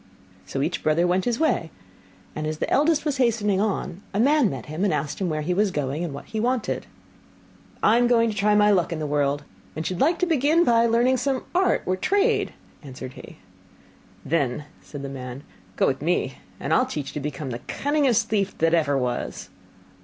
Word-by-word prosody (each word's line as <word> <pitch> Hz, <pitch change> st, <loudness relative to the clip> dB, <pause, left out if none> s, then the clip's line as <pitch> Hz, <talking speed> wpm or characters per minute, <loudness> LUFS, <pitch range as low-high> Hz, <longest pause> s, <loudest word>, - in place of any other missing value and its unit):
So -, -, -2 dB
each -, -, -2 dB
brother 155 Hz, +3 st, +2 dB
went 180 Hz, +1 st, +1 dB
his 240 Hz, -2 st, 0 dB
way; 310 Hz, -, +1 dB, 0.7 s
and 155 Hz, 0 st, -3 dB
as 155 Hz, 0 st, -3 dB
the -, -, -2 dB
eldest 305 Hz, +1 st, +3 dB
was 290 Hz, -2 st, 0 dB
hastening 215 Hz, -6 st, +2 dB
on 200 Hz, -3 st, -2 dB
a -, -, +1 dB
man 280 Hz, -1 st, +4 dB
met 130 Hz, -7 st, -6 dB
him, 155 Hz, +5 st, -4 dB
and 200 Hz, -, +2 dB
asked 150 Hz, -1 st, -2 dB
him 185 Hz, -, 0 dB
where 155 Hz, -1 st, -2 dB
he 180 Hz, +4 st, 0 dB
was 205 Hz, +3 st, +2 dB
going, 150 Hz, -1 st, -2 dB
and 170 Hz, -, -3 dB
what 140 Hz, -, -8 dB
he 220 Hz, -, -4 dB
wanted. 245 Hz, +1 st, -1 dB, 1.0 s
'I 225 Hz, -, +5 dB
am 245 Hz, -, +4 dB
going 230 Hz, -2 st, +3 dB
to -, -, -7 dB
try 210 Hz, 0 st, +3 dB
my 210 Hz, 0 st, +5 dB
luck 180 Hz, -4 st, +2 dB
in 165 Hz, -, -2 dB
the 155 Hz, -, -3 dB
world, 145 Hz, 0 st, 0 dB, 0.3 s
and 160 Hz, -, -4 dB
should 185 Hz, +1 st, -2 dB
like 330 Hz, +5 st, +3 dB
to 360 Hz, -, +1 dB
begin 320 Hz, +1 st, +3 dB
by 235 Hz, -5 st, +4 dB
learning 240 Hz, +3 st, +3 dB
some 260 Hz, +1 st, -1 dB
art 370 Hz, +1 st, +2 dB
or 185 Hz, -, +1 dB
trade,' 405 Hz, -, +1 dB, 0.3 s
answered 130 Hz, -2 st, -8 dB
he. -, -, -12 dB, 0.9 s
'Then,' 145 Hz, -3 st, 0 dB, 0.2 s
said 145 Hz, -2 st, -9 dB
the -, -, -4 dB
man, 130 Hz, 0 st, -7 dB, 0.3 s
'go -, -, +2 dB
with -, -, 0 dB
me, -, -, -1 dB, 0.2 s
and -, -, -1 dB
I -, -, +5 dB
will -, -, +1 dB
teach 145 Hz, -2 st, -4 dB
you -, -, -11 dB
to -, -, -3 dB
become 140 Hz, -1 st, -4 dB
the 120 Hz, -, -4 dB
cunningest 275 Hz, -7 st, +1 dB
thief 200 Hz, -3 st, -1 dB
that 165 Hz, +1 st, +2 dB
ever 150 Hz, -4 st, +2 dB
was. 125 Hz, -2 st, -3 dB
190 Hz, 215 wpm, -24 LUFS, 150-245 Hz, 1.0 s, I